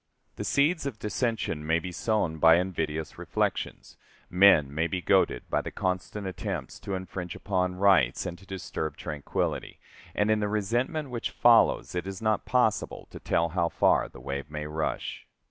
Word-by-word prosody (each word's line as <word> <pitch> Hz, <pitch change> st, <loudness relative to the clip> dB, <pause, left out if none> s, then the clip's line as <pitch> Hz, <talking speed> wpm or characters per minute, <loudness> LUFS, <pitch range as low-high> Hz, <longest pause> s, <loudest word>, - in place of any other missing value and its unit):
The -, -, -3 dB
seeds 150 Hz, +1 st, +2 dB
of 125 Hz, -6 st, -5 dB
dissension 110 Hz, -7 st, -2 dB
may 80 Hz, +2 st, +2 dB
be 90 Hz, +2 st, -5 dB
sown 90 Hz, -4 st, -1 dB
by 80 Hz, +1 st, +7 dB
invidious 80 Hz, -4 st, -2 dB
reflections. -, -, -2 dB, 0.3 s
Men 90 Hz, -7 st, +5 dB
may 80 Hz, +3 st, +1 dB
be 95 Hz, -, -2 dB
goaded -, -, +2 dB
by -, -, +2 dB
the -, -, -5 dB
constant 95 Hz, +2 st, -3 dB
attempts 95 Hz, -3 st, -5 dB
to 100 Hz, -, -4 dB
infringe 90 Hz, -2 st, -5 dB
upon 90 Hz, -2 st, -1 dB
rights 90 Hz, -10 st, +3 dB
and 90 Hz, -, -4 dB
to 95 Hz, -, -17 dB
disturb 90 Hz, -4 st, -4 dB
tranquillity, 75 Hz, -2 st, -3 dB, 0.4 s
and 105 Hz, +1 st, +2 dB
in 110 Hz, -, +3 dB
the 105 Hz, -, 0 dB
resentment 120 Hz, -, -1 dB
which 120 Hz, -1 st, -2 dB
follows 120 Hz, -1 st, +4 dB
it 90 Hz, +1 st, -3 dB
is 95 Hz, -1 st, -5 dB
not 110 Hz, -1 st, 0 dB
possible 125 Hz, -4 st, 0 dB
to -, -, -9 dB
tell 85 Hz, 0 st, +1 dB
how 85 Hz, 0 st, 0 dB
far -, -, +2 dB
the -, -, -13 dB
wave 70 Hz, +3 st, -5 dB
may 75 Hz, 0 st, -5 dB
rush. 75 Hz, +1 st, -3 dB
90 Hz, 170 wpm, -28 LUFS, 80-105 Hz, 0.4 s, by